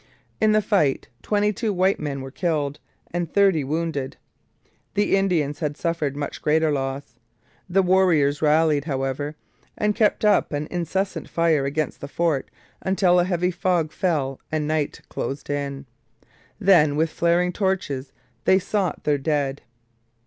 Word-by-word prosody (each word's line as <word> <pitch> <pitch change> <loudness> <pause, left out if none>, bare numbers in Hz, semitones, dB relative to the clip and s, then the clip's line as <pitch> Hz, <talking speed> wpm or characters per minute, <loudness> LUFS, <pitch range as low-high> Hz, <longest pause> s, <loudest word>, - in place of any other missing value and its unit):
In 215 0 +4
the 215 0 +3
fight 155 -10 +1
twenty 210 0 +1
two 220 +1 -1
white 190 0 +2
men 140 -3 -3
were 135 0 -8
killed 150 -3 -1 0.3
and 175 -2 -2
thirty 195 -7 +3
wounded. 145 -2 -3 0.8
The 205 -1 +3
Indians 165 -7 0
had 150 -2 -2
suffered 165 -5 -1
much 145 0 -5
greater 155 +1 +2
loss. 135 -3 -4 0.5
The 195 +2 +3
warriors 175 -6 +3
rallied, 155 -1 +3
however, 135 +1 -2 0.4
and 210 0 +1
kept 215 -1 +2
up 210 - +3
an 145 +1 -2
incessant 180 +3 -2
fire 165 -4 +2
against 145 +2 -2
the 140 - -5
fort 155 -2 -1 0.3
until 190 -2 +3
a 175 - +3
heavy 180 0 0
fog 175 -3 0
fell 145 -7 -1
and 155 -1 -1
night 155 -2 -1
closed 140 +1 -4
in. 140 -1 -3 0.7
Then 175 -8 +4
with 160 +1 +1
flaring 175 +2 +1
torches 160 -10 -2 0.3
they 190 - +5
sought 195 0 -1
their 145 -1 +1
dead. 140 -1 -1
160 Hz, 145 wpm, -23 LUFS, 145-185 Hz, 0.8 s, they